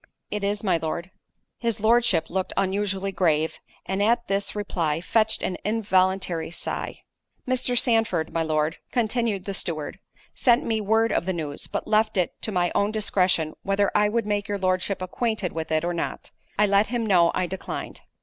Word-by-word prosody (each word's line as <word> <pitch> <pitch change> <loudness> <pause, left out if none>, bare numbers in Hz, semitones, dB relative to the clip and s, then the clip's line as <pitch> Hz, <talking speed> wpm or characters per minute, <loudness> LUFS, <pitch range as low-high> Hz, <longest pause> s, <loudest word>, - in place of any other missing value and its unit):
"It 210 -1 -3
is, 205 +1 -1
my 185 -5 +2
Lord." 165 +3 -4 0.5
His 230 -2 -1
Lordship 220 -6 +3
looked 190 +1 -2
unusually 195 0 0
grave, 160 -4 +1 0.3
and 190 +1 -1
at 235 +3 +2
this 200 +1 -1
reply, 170 -7 -1
fetched 220 +5 +1
an 180 - -1
involuntary 190 -5 +1
sigh. 170 - -5 0.4
"Mr. 250 -1 0
Sandford, 225 -10 +2
my 165 - +1
lord," 155 0 0
continued 225 -4 0
the 200 - -3
steward, 155 -5 -3 0.3
"sent 240 -1 +3
me 220 -1 0
word 220 +2 +2
of 170 - 0
the 190 - +1
news, 150 -4 -4
but - - -4
left 215 -1 +2
it 180 - +1
to 220 - -2
my 175 -2 +1
own 200 - +2
discretion, 185 -7 +1
whether 195 0 +1
I 210 0 +3
would 230 0 0
make 205 -1 -1
your 205 - -1
Lordship 185 0 0
acquainted 215 0 -1
with 160 -1 -5
it 155 +1 +1
or 175 - -1
not: 170 - -4 0.3
I 210 - +5
let 200 +1 +3
him 240 -1 -1
know 175 -5 +4
I 185 - +1
declined." 190 +2 -6
195 Hz, 180 wpm, -25 LUFS, 175-215 Hz, 0.5 s, I